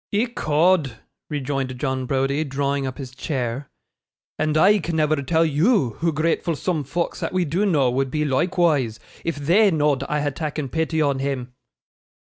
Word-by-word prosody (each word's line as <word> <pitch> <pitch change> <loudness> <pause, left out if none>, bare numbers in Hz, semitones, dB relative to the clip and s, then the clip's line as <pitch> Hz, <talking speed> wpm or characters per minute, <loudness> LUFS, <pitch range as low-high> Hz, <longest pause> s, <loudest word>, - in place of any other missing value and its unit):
'Ecod!' 175 - +1 0.3
rejoined 135 -3 -3
John 130 -2 -2
Browdie, 135 +3 0
drawing 140 -1 -1
up 130 - -6
his 130 -3 -8
chair; 130 -1 -3 0.7
'and 155 0 +1
I 200 +6 +5
can 165 -1 -3
never 155 -1 +2
tell 160 +4 +2
YOU 155 - +2
hoo 165 0 +1
gratful 165 +2 0
soom 160 0 -1
folks 165 +6 -3
that - - -3
we 185 -1 +1
do 180 +8 0
know 140 -9 +3
would 135 +1 0
be 150 +3 -1
loikewise, 145 -5 +1 0.3
if 165 - -2
THEY 175 +9 +4
know'd 150 -5 +1
I 150 0 0
had 145 -2 -2
takken 150 -4 -4
pity 160 +1 0
on 140 -2 +1
him. 135 -2 -3
150 Hz, 165 wpm, -22 LUFS, 135-165 Hz, 0.7 s, I